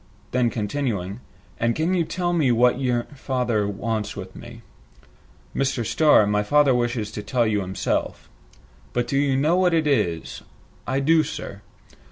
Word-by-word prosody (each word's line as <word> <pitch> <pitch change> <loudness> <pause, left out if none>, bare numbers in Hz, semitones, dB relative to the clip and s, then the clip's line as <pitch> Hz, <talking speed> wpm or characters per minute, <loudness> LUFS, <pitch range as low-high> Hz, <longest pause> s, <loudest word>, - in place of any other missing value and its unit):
Then, 125 -1 +2
continuing, 105 -3 -3 0.4
"And 115 0 +1
can 165 +4 0
you 175 -2 +2
tell 175 +1 -2
me 150 -7 +2
what 120 +2 +3
you 125 -3 0
father 125 -6 -1
wants 105 +1 -3
with 95 -2 -8
me?" - - -11 0.9
"Mr. 135 -4 0
Starr, 130 0 +4
my 105 0 +1
father 145 +5 +4
wishes 120 -3 -1
to 105 - -5
tell 120 +3 0
you 105 -2 +1
himself." 95 0 -3 0.7
"But 120 0 -1
you 135 -1 +2
know 155 +6 +2
what 180 -2 +3
it 160 -1 +1
is?" 85 - -1 0.5
"I 135 +1 0
do, 160 +3 +4
sir." 100 -8 -6
125 Hz, 155 wpm, -23 LUFS, 105-145 Hz, 0.9 s, Starr